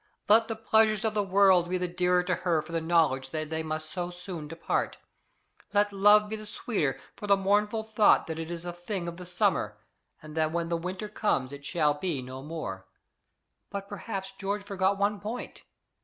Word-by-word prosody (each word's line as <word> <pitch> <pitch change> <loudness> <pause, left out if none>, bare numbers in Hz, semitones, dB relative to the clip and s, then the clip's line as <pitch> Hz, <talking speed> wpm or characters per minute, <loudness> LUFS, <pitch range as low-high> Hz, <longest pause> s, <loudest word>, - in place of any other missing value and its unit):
Let 220 +2 +6
the 225 - -3
pleasures 220 -1 +3
of 220 - +1
the 210 - +2
world 190 -3 +4
be 185 - +1
the 180 0 -1
dearer 180 0 +2
to 180 0 0
her 170 -4 +1
for 165 - -11
the 165 0 -1
knowledge 160 -6 +2
that 155 +1 -4
they 160 0 -1
must 155 0 -4
so 180 -1 -3
soon 175 -3 -7
depart; 165 +2 -2 0.8
let 205 0 +3
love 205 +2 +6
be 220 - -4
the 215 -1 -9
sweeter 205 - -1 0.2
for 205 - -7
the 200 -1 +5
mournful 210 +3 +1
thought 220 -1 +4
that 160 0 -5
it 165 0 -5
is 170 0 -6
a 175 - -4
thing 175 +1 -4
of 170 0 -5
the 180 -1 -9
summer, 180 - +1 0.4
and 155 0 -11
that 155 -1 +1
when 170 0 -1
the 170 - +1
winter 180 +5 -4
comes 205 -11 0
it 140 0 -9
shall 150 -4 +2
be 150 -1 -2
no 130 +1 -8
more! 140 -11 -6 0.8
But 200 -1 -5
perhaps 195 -1 -5
George 200 +1 -2
forgot 195 -1 +1
one 200 +1 +1
point. 220 +5 -6
180 Hz, 200 wpm, -29 LUFS, 160-205 Hz, 0.8 s, Let